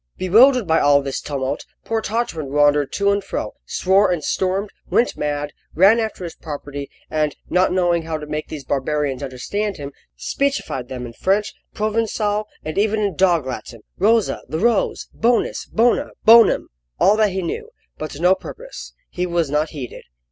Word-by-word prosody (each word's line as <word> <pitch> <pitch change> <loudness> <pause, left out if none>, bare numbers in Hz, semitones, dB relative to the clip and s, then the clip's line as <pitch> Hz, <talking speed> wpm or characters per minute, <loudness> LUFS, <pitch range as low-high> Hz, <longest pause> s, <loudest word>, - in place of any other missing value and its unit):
Bewildered 235 +6 +5
by 160 -1 +3
all 145 -1 +4
this 135 -1 -3
tumult, 140 0 -3 0.2
poor 225 -1 -1
Tartarin 210 - -2
wandered 145 -1 +3
to 200 0 +2
and 200 0 0
fro, 195 - -4
swore 195 +2 +3
and 175 -4 -1
stormed, 190 +5 -1 0.2
went 240 - +2
mad, 145 0 -3 0.2
ran 195 +8 +6
after 220 -4 -3
his 170 - -5
property, 145 -2 -7 0.2
and 155 -2 0 0.2
not 180 +1 +3
knowing 175 -2 +2
how 160 -1 -3
to 150 - -7
make 150 +1 -4
these 150 -3 -7
barbarians 140 -1 -1
understand 190 +11 -3
him, 145 -1 -7 0.3
speechified 205 - -2
them 125 -1 -6
in 115 - -9
French, 195 - 0 0.2
Provencal, 215 -1 0 0.2
and 155 +5 -2
even 215 +1 +2
in 200 -5 -1
dog 175 -5 +3
Latin: 125 -3 -7 0.2
"Rosa, 220 +3 +2
the 155 - -2
rose; 225 +3 +1
bonus, 235 +1 +1
bona, 235 +2 +2 0.2
bonum!" 230 +1 +6 0.3
all 205 - +5
that 215 -1 +4
he 190 -1 -3
knew 445 - -4 0.3
but 155 - -4
to 145 - -9
no 180 +1 +6
purpose. - - -9
He 180 0 -3
was 170 -4 0
not 150 +2 +1
heeded. 135 -6 -8
180 Hz, 170 wpm, -21 LUFS, 145-210 Hz, 0.3 s, ran